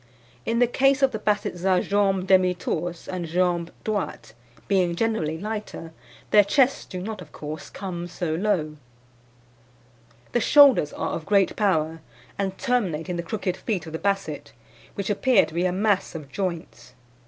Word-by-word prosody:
In 230 +1 +1
the 245 - +5
case 270 +3 +2
of 270 - +5
the 220 - -4
Bassets 205 -4 -1
a 190 -1 +3
jambes 195 -2 +1
demi 185 -1 +4
torses 175 -1 -4
and 180 -2 -4
jambes 175 0 0 0.2
droites, 205 - -3 0.3
being 180 -3 +2
generally 170 -7 -1
lighter, 210 -4 -6 0.4
their 210 - +7
chests 265 +6 +2
do 185 - -7
not, 215 +4 -5
of - - -12
course, 155 +1 -7
come 175 -3 -6
so 175 -2 -3
low. 165 -4 -1 1.5
"The 240 - +2
shoulders 270 - +6
are - - -3
of 160 - -5
great 200 -2 +3
power, 165 -6 0 0.4
and 190 -1 -2
terminate 190 - -1
in 180 - -2
the 170 - -2
crooked 185 +1 -3
feet 195 -8 -3
of 160 - -9
the 160 - -3
Basset, 195 -7 -2 0.4
which 200 +1 -2
appear 240 +1 +4
to - - -12
be 175 +2 0
a - - 0
mass 195 -1 0
of 145 -4 -8
joints. 170 -7 -5
185 Hz, 165 wpm, -24 LUFS, 170-210 Hz, 1.5 s, their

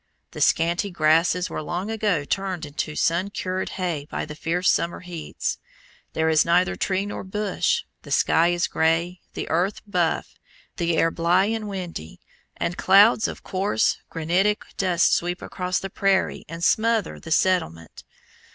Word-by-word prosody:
The - - -7
scanty 170 +5 +2
grasses 170 +2 +2
were - - -5
long 175 +7 -3
ago 205 -9 0
turned 185 -1 -2
into 150 +1 -4
sun 175 +6 +1
cured 185 -1 -3
hay 170 -6 -2
by - - -3
the 150 - -8
fierce 170 +4 +1
summer 170 - -1
heats. 175 -3 -4 0.5
There 160 0 +1
is 160 -1 +4
neither 175 +2 +2
tree 195 0 -1
nor 205 - -5
bush, 210 - -1 0.2
the - - -13
sky 165 +1 +3
is 175 0 +1
grey, 170 +3 0
the - - -4
earth 180 +5 0
buff, 180 -5 -1 0.4
the 170 -1 0
air 165 - +3
blae 175 +6 +2
and 215 -2 -5
windy, 175 - -6 0.4
and 175 - -2
clouds 205 +4 +5
of - - -8
coarse 185 - 0
granitic 180 +6 +1
dust 180 -3 +2
sweep 175 +1 0
across 180 0 -3
the 195 - -5
prairie 195 -1 +1
and 165 +1 -6
smother 225 +2 +1
the - - -10
settlement. 85 - 0
180 Hz, 155 wpm, -24 LUFS, 165-195 Hz, 0.5 s, clouds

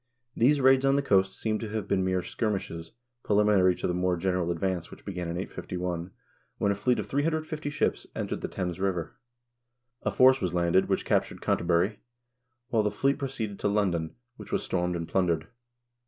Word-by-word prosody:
These 140 +5 +4
raids 130 0 +5
on 135 0 +4
the 140 - +1
coast 95 -6 +3
seem 110 -1 0
to 110 - -5
have 105 -2 -3
been 95 - +1
mere 95 -1 0
skirmishes 95 -6 -3 0.3
pre 105 - 0
liminary 100 -3 +4
to - - -4
the 90 - +1
more 90 0 +1
general 90 0 0
advance 85 0 -1
which - - -14
began 90 -3 -4
in 85 +1 -3
851, 90 -1 -4 0.5
when 100 - +2
a - - 0
fleet 120 +5 +1
of - - -2
350 155 +1 -1
ships 145 - -1
entered - - -3
the - - -2
Thames 90 -2 -4
River.1 90 -4 -1 0.9
A - - 0
force 130 +1 +5
was 90 -2 -1
landed, 85 +2 +2
which - - 0
captured - - 0
Canterbury, 85 +5 +1 0.7
while 115 -4 +3
the 105 - +1
fleet 135 +7 0
proceeded 115 -7 -4
to - - 0
London, 95 -6 0 0.2
which - - -11
was - - 0
stormed 90 -1 -1
and 85 -1 -4
plundered. 85 -4 0
95 Hz, 185 wpm, -28 LUFS, 90-110 Hz, 0.9 s, raids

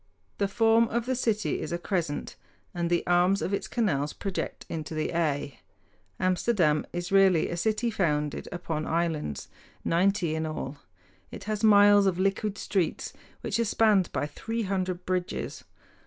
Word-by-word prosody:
The 200 - +2
form 225 +2 +3
of 235 +1 -2
the 260 - 0
city 225 -4 0
is - - -5
a 170 - 0
crescent, 170 -4 -3 0.4
and 170 -2 -1
the 175 -1 +1
arms 180 +2 +3
of 195 - -2
its 200 - -2
canals 150 - 0
project 195 -2 -4
into 160 0 -5
the 155 - -1
Y. 145 -5 -1 0.6
Amsterdam 180 -4 +2
is 175 +1 -4
really 195 -4 +4
a - - -2
city 220 +6 0
founded 150 -7 -1
upon 165 -3 -3
islands, 160 - -2 0.4
ninety 180 -1 +2
in 160 0 -2
all. 145 -2 -5 0.5
It - - -9
has 215 0 -3
miles 205 -1 +7
of 185 -2 +1
liquid 195 +2 0
streets, 185 -5 -1 0.3
which 215 - -2
are - - +3
spanned 215 -4 +3
by - - -1
three 225 +9 -4
hundred 185 -2 -2
bridges. 180 -1 -3
185 Hz, 155 wpm, -27 LUFS, 165-205 Hz, 0.6 s, miles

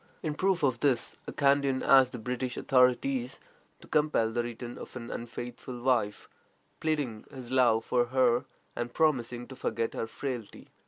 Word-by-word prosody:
In 155 -3 -1
proof 185 +1 +1
of 130 -4 +2
this, 135 -5 +1
a - - -4
Kandian 140 -2 +2
asked 135 -2 +6
the - - -4
British 125 +2 -3
authorities 135 - +2 0.4
to - - -14
compel 150 -7 +2
the 120 +1 0
return 120 0 -6
of - - -10
an 120 -2 -6
unfaithful 120 +1 -6
wife, 120 -5 0 0.5
pleading 145 -9 -1
his 130 -3 -9
love 120 -4 +3
for 120 -1 +2
her, 125 -1 +2 0.3
and 120 0 -4
promising 125 -6 +1
to 130 - -8
forget 115 -2 -2
her 115 - -3
frailty. 120 -3 -6
125 Hz, 160 wpm, -29 LUFS, 120-140 Hz, 0.5 s, asked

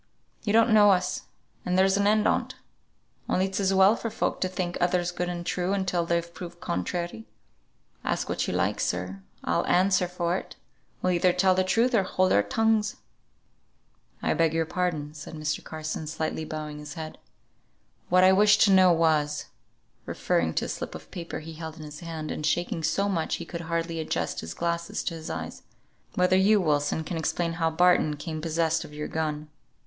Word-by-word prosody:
You 205 - 0
don't 225 +1 +5
know 210 -1 +7
us, 185 -2 +1 0.4
and 180 0 0
there's 190 +1 +4
an 200 0 +2
end 215 0 +3
on't; - - 0 0.7
only 185 - +2
it's 195 +1 -3
as 195 -1 +2
well 195 +3 +6
for 230 - -4
folk 220 - -2
to 185 - +2
think 180 -1 -3
others 175 0 +1
good 175 0 -3
and 175 -1 -5
true 180 +2 -1
until 180 -3 0
they're 170 0 +1
proved 175 0 -10
contrary. 170 - -3 0.8
Ask - - -1
what - - -1
you - - -2
like, - - 0
sir, 90 +2 -2 0.2
I'll - - +1
answer 185 0 +3
for 175 0 -1
it - - -9 0.5
we'll 185 - +3
either 180 +1 +3
tell 185 +1 +3
truth 230 +7 +2
or 220 - +5
hold 185 0 +1
our 100 - +5
tongues." 220 - +1 1.3
"I - - +2
beg 165 -1 +2
your 165 0 +1
pardon," 160 -3 -2
said 155 +1 -9
Mr. 155 0 -2
Carson, 155 0 -5
slightly 160 0 -3
bowing 150 -1 -6
his 150 -1 -8
head. 155 -1 -7 0.9
"What 185 +1 +5
I 185 - +7
wished 205 +1 +5
to 205 - +6
know 185 -1 +7
was," 155 -3 +2 0.6
referring 80 -1 0
to - - 0
a - - -6
slip - - -5
of - - -11
paper 170 -4 -6
he 160 +1 -9
held 160 0 -7
in 155 - -9
his 150 0 -9
hand, 165 -2 -5
and - - -4
shaking 175 +1 0
so 180 +6 +1
much 170 -5 -1
he 170 - -7
could 170 0 -6
hardly 165 0 -2
adjust 160 - -2
his 80 0 -7
glasses 170 0 -2
to - - -2
his 160 -1 -7
eyes, 80 0 -5 0.5
"whether 180 0 +3
you, 200 +3 +5
Wilson, 150 -2 +1
can 165 +1 -4
explain 165 +1 -1
how 165 - +3
Barton 160 -2 +3
came 155 +1 -5
possessed 165 0 0
of 150 - -11
your 150 0 -4
gun. 155 -1 -3
170 Hz, 190 wpm, -27 LUFS, 155-185 Hz, 1.3 s, know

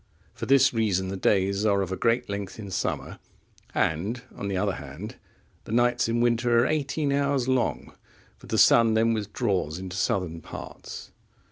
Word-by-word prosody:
For - - -6
this 135 -1 +5
reason 100 -5 0
the 95 - -3
days 100 +1 +1
are 100 -2 +2
of 95 - -6
a - - -1
great 115 +4 +1
length 100 -2 -5
in 100 -3 -8
summer, - - -3 0.6
and 100 +10 0
on 100 - -5
the 95 -1 -1
other 100 0 0
hand, 75 +9 -8 0.5
the - - -8
nights 120 0 +2
in 120 +1 +1
winter 120 0 +3
are - - +1
eighteen 145 -1 0
hours 140 -2 +1
long, 130 -2 0 0.5
for - - -14
the - - -1
sun 115 -1 +6
then 115 +1 +3
withdraws 100 - -1
into 90 -1 -6
southern 90 -3 -1
parts. - - -9
110 Hz, 170 wpm, -26 LUFS, 95-120 Hz, 0.6 s, sun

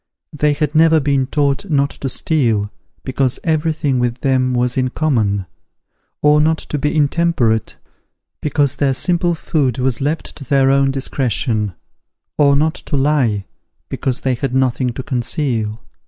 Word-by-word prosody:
They 150 0 +1
had 150 0 -2
never 160 0 +5
been 140 -2 +1
taught 145 +6 0
not 140 -2 +1
to 135 - -5
steal, 115 -10 0 0.3
because 130 -1 0
every 160 0 +1
thing 140 -4 -1
with 120 0 -1
them 130 -2 +1
was 125 0 0
in 130 -1 +1
common: 110 -10 0 0.8
or 150 0 +5
not 160 +1 +2
to 150 - -5
be 150 +3 -1
intemperate, 145 -7 +1 0.7
because 145 -2 0
their 135 -2 +1
simple 175 +2 +1
food 140 -6 -1
was 130 0 0
left 150 +4 -2
to 140 - -9
their 135 0 +3
own 135 0 +3
discretion; 120 - -1 0.6
or 140 -2 +4
not 155 +3 +2
to 145 - -4
lie, 135 -8 +1 0.4
because 130 -1 -2
they 130 - 0
had 125 +1 -3
nothing 130 -1 +1
to 125 +2 -5
conceal. 120 -4 -2
135 Hz, 155 wpm, -18 LUFS, 125-150 Hz, 0.8 s, never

